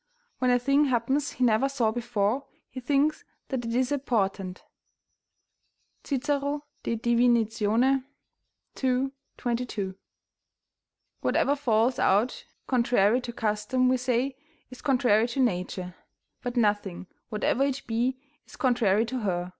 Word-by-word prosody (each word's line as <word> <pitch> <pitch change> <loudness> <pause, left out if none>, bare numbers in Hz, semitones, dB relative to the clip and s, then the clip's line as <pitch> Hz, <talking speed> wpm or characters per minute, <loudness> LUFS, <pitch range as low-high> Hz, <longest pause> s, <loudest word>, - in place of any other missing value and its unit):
When 255 - +2
a 245 - +5
thing 275 +4 +3
happens 265 +3 0
he 255 - -2
never 240 +3 +3
saw 245 -5 +1
before, 235 +1 -1 0.2
he 260 - -6
thinks 285 +4 +1 0.3
that 260 -3 -2
it 230 0 -2
is 255 +2 +1
a 285 - +1
portent." 195 -7 -1 1.4
Cicero, 285 +1 -1 0.2
De 230 - -1
Divin., 235 +1 +3
ii. 225 +4 +1 1.3
22.] 235 -6 -3 1.3
Whatever 285 - +2
falls 245 -3 +1
out 210 +6 +2 0.2
contrary 240 -2 +3
to 245 - -5
custom 225 +3 0
we 255 - +3
say 255 +1 0 0.4
is 255 - -11
contrary 245 -5 +3
to 245 +3 -4
nature, 180 -5 -1 0.5
but 245 0 -4
nothing, 205 -5 0 0.2
whatever 225 +4 +1
it 275 -1 -1
be, 240 +3 0 0.3
is - - -13
contrary 235 -5 +2
to 255 +2 -3
her. 180 -4 -2
245 Hz, 125 wpm, -27 LUFS, 215-260 Hz, 1.4 s, a